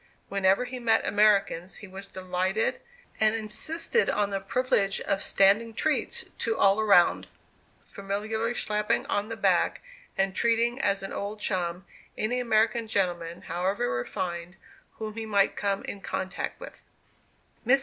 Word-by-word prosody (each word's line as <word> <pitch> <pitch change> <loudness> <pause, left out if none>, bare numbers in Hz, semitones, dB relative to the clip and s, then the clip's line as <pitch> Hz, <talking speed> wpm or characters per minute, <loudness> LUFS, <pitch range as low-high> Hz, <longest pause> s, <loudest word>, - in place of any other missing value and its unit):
Whenever 195 +4 +2
he 255 0 -6
met 225 -2 +2
Americans 200 -4 +2
he 205 - -10
was 195 +1 -7
delighted, 185 +3 -1 0.4
and 220 0 +3
insisted 315 - 0
on 205 -1 0
the 195 - -1
privilege 200 -1 +1
of 195 - -1
"standing 215 +4 +3
treats" 310 +5 0
to 225 -1 -1
all 195 +2 +4
around, 200 -5 +4 0.6
familiarly 215 +4 -3
slapping 210 -2 0
on 205 +2 -1
the 225 - -5
back, - - +2 0.4
and 195 0 +1
treating 235 +2 +2
as 200 -1 +1
an 195 - -5
old 205 +1 -4
chum, 180 -2 -2 0.3
any 240 +4 0
American 230 -1 +2
gentleman, 175 -5 -1
however 180 -7 -1
refined, 170 +8 -4 0.4
whom 215 -1 -6
he 225 0 -5
might 200 -2 +2
come 200 -1 -1
in 200 - -6
contact 190 0 -4
with. - - -11 0.8
Mrs. 260 +4 +5
205 Hz, 140 wpm, -27 LUFS, 195-225 Hz, 0.8 s, Mrs